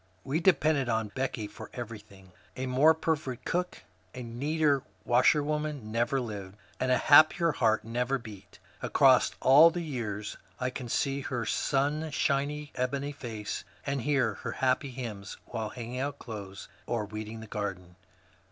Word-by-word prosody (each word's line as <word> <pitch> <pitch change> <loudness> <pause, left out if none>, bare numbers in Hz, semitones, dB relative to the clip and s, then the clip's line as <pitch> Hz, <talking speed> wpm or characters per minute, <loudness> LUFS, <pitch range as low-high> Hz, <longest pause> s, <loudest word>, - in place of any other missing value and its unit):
We 140 +4 -1
depended 155 -7 +3
on 110 -2 0
Becky 130 -4 -2
for - - -10
everything. 105 -6 -9 0.2
A 130 - -3
more 140 +5 +5
perfect 155 -6 -2
cook, 180 +1 -2 0.3
a 125 - -6
neater 140 +4 +1 0.2
washerwoman, 145 0 +2
never 120 +4 +1
lived, 105 -5 -6 0.2
and 130 0 +1
a 125 - +5
happier 155 +4 +6
heart 110 -6 +2
never 125 +4 0
beat. 105 -5 -12 0.2
Across - - +4
all 150 +5 +8
the 175 +1 -4
years 110 -9 -4 0.2
I 125 0 -1
can 125 -2 -6
see 135 +3 0
her 120 -3 -3
sunshiny 145 +1 0
ebony 140 +3 -2
face, 115 -7 -5 0.2
and 140 -2 -1
hear 130 -4 +1
her - - -4
happy 130 +1 +1
hymns 115 -6 -6
while 110 -2 -4
hanging 120 +2 -6
out 140 +1 -2
clothes, 100 -6 -8 0.2
or 115 -3 -1
weeding 110 +2 -7
the - - -8
garden. 95 -4 -5
125 Hz, 145 wpm, -29 LUFS, 110-145 Hz, 0.3 s, all